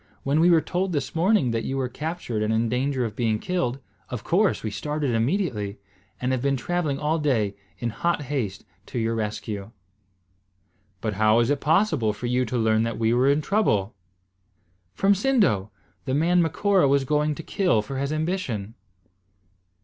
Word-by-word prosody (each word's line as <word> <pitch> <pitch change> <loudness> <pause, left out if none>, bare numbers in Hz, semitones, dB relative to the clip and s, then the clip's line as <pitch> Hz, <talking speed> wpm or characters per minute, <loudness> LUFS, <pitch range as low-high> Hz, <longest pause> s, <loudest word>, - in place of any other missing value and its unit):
"When 140 +3 +1
we 170 +2 +5
were 165 -2 +5
told 180 +2 -2
this 145 - -2
morning 170 - +2
that 115 -1 -1
you 135 - -2
were 130 -1 0
captured 150 -4 -4
and 110 +1 0
in 110 +1 +1
danger 130 +1 0
of 105 -3 -5
being 110 -3 +1
killed, 130 -3 -1 0.3
of 125 -3 -5
course 195 +3 +2
we 110 - -2
started 150 +4 -2
immediately, 115 - -1 0.4
and 125 +1 -1
have 130 -2 0
been 140 0 +1
travelling 155 +1 -1
all 155 +3 0
day 115 -9 +1 0.2
in 120 -1 -2
hot 170 +5 -1
haste 130 -8 -3 0.2
to - - -6
your 115 0 0
rescue." 105 -2 -4 1.3
"But 110 -2 -1
how 110 +1 +5
was 120 +3 +3
it 145 - +1
possible 155 - +2
for 105 +4 -7
you 125 +1 +1
to 125 +2 -2
learn 110 -1 +2
that 115 0 -2
we 115 +1 +2
were 125 +3 +3
in 145 +2 +3
trouble?" 130 - +1 1.0
"From 195 +1 +4
Sindo, 200 - +2 0.4
the 130 -1 0
man 175 +4 +3
Macora 180 +1 +2
was 140 0 +3
going 150 +2 +1
to 165 - -8
kill 175 - +1
for 135 +5 -5
his 140 +1 -1
ambition." 155 - -2
135 Hz, 180 wpm, -25 LUFS, 115-165 Hz, 1.3 s, we